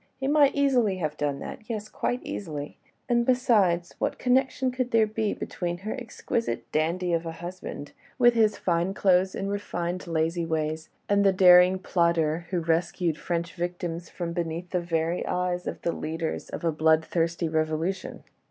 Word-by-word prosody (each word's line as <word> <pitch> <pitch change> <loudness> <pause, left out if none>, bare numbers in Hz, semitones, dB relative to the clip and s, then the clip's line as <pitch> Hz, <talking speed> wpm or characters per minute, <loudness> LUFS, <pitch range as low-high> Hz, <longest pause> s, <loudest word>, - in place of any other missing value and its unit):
He 270 - -2
might 290 -1 +4
easily 250 -9 +2
have 155 -4 -2
done 145 -2 -1
that... 220 - -8
yes... 215 -2 -3
quite 245 +3 -2
easily... 150 -6 -6 0.3
and... 240 -2 +3
besides... 215 -9 +2
what - - -1
connection 260 0 +1
could 255 0 -2
there 225 -2 +4
be 215 0 -1
between 175 -1 -4
her 215 - -2
exquisite 235 -2 -3
dandy 170 +3 0
of 165 0 0
a 165 - -4
husband, 175 -3 -7 0.3
with 240 -1 +6
his 220 -3 +3
fine 175 +2 0
clothes 190 -1 +3
and 195 +1 -3
refined, 180 -3 -3
lazy 165 +1 0
ways, 160 -1 -2 0.2
and 200 0 +3
the 195 - +5
daring 180 0 +7
plotter 170 -3 +1
who 180 -2 -1
rescued 165 0 0
French 170 0 -2
victims 175 -1 -4
from 170 -2 -4
beneath 170 0 -4
the 180 - 0
very 165 0 -1
eyes 180 0 -1
of - - -4
the 170 - +1
leaders 160 0 -4
of - - -6
a 165 - +3
bloodthirsty 160 +2 +1
revolution? 160 +4 -2
175 Hz, 165 wpm, -26 LUFS, 165-205 Hz, 0.3 s, daring